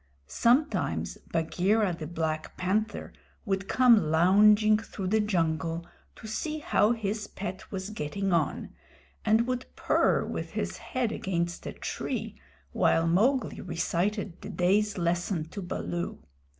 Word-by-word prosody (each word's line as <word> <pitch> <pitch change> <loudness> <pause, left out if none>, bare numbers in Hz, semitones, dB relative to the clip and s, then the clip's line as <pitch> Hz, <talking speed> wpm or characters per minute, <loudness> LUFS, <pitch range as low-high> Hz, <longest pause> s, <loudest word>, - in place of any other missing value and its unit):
Sometimes 245 - +1
Bagheera 185 +5 +1
the 155 -2 -6
Black 160 -1 -3
Panther 205 +3 -1 0.3
would 195 -2 -1
come 235 -10 +5
lounging 210 +6 +5
through 195 -4 -5
the 220 +2 +3
jungle 165 -4 0 0.3
to - - -13
see 305 +8 -3
how 235 -6 +2
his 210 -1 -3
pet 190 -1 -7
was 190 +1 -4
getting 195 +1 -2
on, 160 -4 0 0.5
and 220 +2 +3
would 255 0 -3
purr - - +2
with - - -5
his - - -3
head 250 -4 -2
against 175 -4 -2
a - - -5
tree - - -4 0.4
while 165 - +3
Mowgli 220 +10 +2
recited 180 +3 -2
the - - -7
day's 200 +4 +1
lesson 170 -1 0
to 200 - -6
Baloo. 175 -1 -4
195 Hz, 130 wpm, -28 LUFS, 170-215 Hz, 0.5 s, come